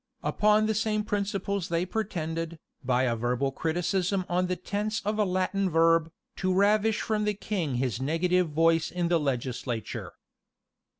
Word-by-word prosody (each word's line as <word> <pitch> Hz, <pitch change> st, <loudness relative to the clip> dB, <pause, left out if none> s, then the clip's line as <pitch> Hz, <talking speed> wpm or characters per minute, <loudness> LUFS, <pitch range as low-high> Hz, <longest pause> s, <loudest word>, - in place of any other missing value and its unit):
Upon 210 Hz, 0 st, +3 dB
the 220 Hz, -, +1 dB
same 215 Hz, 0 st, 0 dB
principles 200 Hz, -2 st, -2 dB
they 170 Hz, +1 st, 0 dB
pretended, 165 Hz, -5 st, -3 dB, 0.3 s
by 125 Hz, 0 st, +2 dB
a 120 Hz, -2 st, +1 dB
verbal 125 Hz, +4 st, 0 dB
criticism 180 Hz, +5 st, -1 dB
on 180 Hz, +1 st, +1 dB
the 180 Hz, -, -1 dB
tense 205 Hz, +4 st, -2 dB
of 210 Hz, +1 st, -1 dB
a 210 Hz, -, +4 dB
Latin 185 Hz, +1 st, 0 dB
verb, 165 Hz, 0 st, +3 dB, 0.3 s
to 185 Hz, 0 st, 0 dB
ravish 210 Hz, +3 st, +3 dB
from 215 Hz, -1 st, 0 dB
the 210 Hz, 0 st, 0 dB
king 180 Hz, -9 st, -2 dB
his 125 Hz, -1 st, -1 dB
negative 175 Hz, +4 st, +1 dB
voice 165 Hz, +1 st, +2 dB
in 175 Hz, -1 st, -1 dB
the 170 Hz, -1 st, +3 dB
legislature. 125 Hz, -4 st, -3 dB
180 Hz, 155 wpm, -28 LUFS, 160-205 Hz, 0.3 s, a